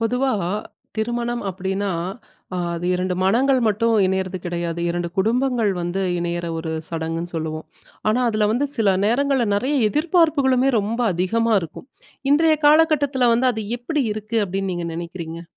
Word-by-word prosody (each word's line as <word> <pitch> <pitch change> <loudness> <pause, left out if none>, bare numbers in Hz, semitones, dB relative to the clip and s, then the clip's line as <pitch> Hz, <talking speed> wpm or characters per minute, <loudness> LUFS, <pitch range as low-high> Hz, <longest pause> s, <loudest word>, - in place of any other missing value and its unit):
பொதுவா 250 +4 +1 0.7
திருமணம் 240 +2 -2
அப்படின்னா, 190 +2 -2 0.7
அ - - -2 0.2
அது 170 +1 -4
2 180 0 -1
மனங்கள் 255 +7 +3
மட்டும் 225 +2 +1
இணையறது 190 0 -1
கிடையாது. 170 -1 -3
2 175 0 -2
குடும்பங்கள் 235 0 +1
வந்து 175 +3 -2 0.2
இணையிற, 175 0 -2
ஒரு 160 0 -4 0.2
சடங்குன்னு 165 +1 -3
சொல்லுவோம். 155 0 -4 0.4
ஆனா, 220 +4 +2
அதில 215 -1 +1
வந்து 260 +5 +1
சில 200 -5 +3
நேரங்கள்ல, 265 +1 +2
நெறய 260 +8 0
எதிர்பார்ப்புகளுமே, 290 - +2
ரொம்ப 220 +4 -3
அதிகமா 225 +6 +1
இருக்கும். 165 - -9 0.4
இன்றைய 315 +1 +4
காலகட்டத்தில 295 -4 +4
வந்து, 255 +2 +3
அது 220 -1 -4 0.2
எப்படி 290 +5 -1
இருக்கு 215 +2 -2
அப்படின்னு 195 0 -3
நீங்க 175 -1 -3
நெனைக்கிறீங்க? 170 -1 -6
215 Hz, 140 wpm, -22 LUFS, 175-255 Hz, 0.7 s, இன்றைய